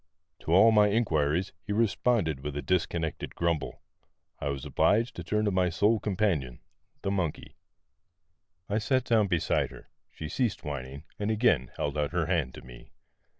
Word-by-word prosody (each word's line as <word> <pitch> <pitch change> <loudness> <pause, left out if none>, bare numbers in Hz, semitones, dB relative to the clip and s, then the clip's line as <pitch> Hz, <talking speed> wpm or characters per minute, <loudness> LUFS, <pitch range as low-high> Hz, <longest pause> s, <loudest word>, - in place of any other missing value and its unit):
To - - -5
all 95 +6 +7
my 105 -1 +5
inquiries 90 -5 +1
he 105 - -7
responded 105 - +1
by 75 - -4
a 75 0 -4
dis 90 -2 +1
connected 80 -2 -4
grumble. 85 -2 -2 0.6
I 70 - -2
was 70 -1 -4
obliged 105 - +2
to 85 - -6
turn 105 +5 0
to 105 - +1
my 90 -1 +2
sole 105 +6 +2
companion, 95 - -1 0.4
the 95 - 0
monkey. 95 -6 -3 1.1
I 105 +2 0
sat 130 +3 +1
down 110 -4 +3
beside 85 -4 +1
her; - - -14 0.2
she 80 - -7
ceased 115 - -1
whining, 70 -1 -6 0.2
and 105 +1 -1
again 105 - +2
held 75 +1 -2
out 75 +2 -1
her 85 -2 +1
hand 80 -7 -1
to - - -11
me. 60 -1 -13
90 Hz, 170 wpm, -28 LUFS, 75-105 Hz, 1.1 s, all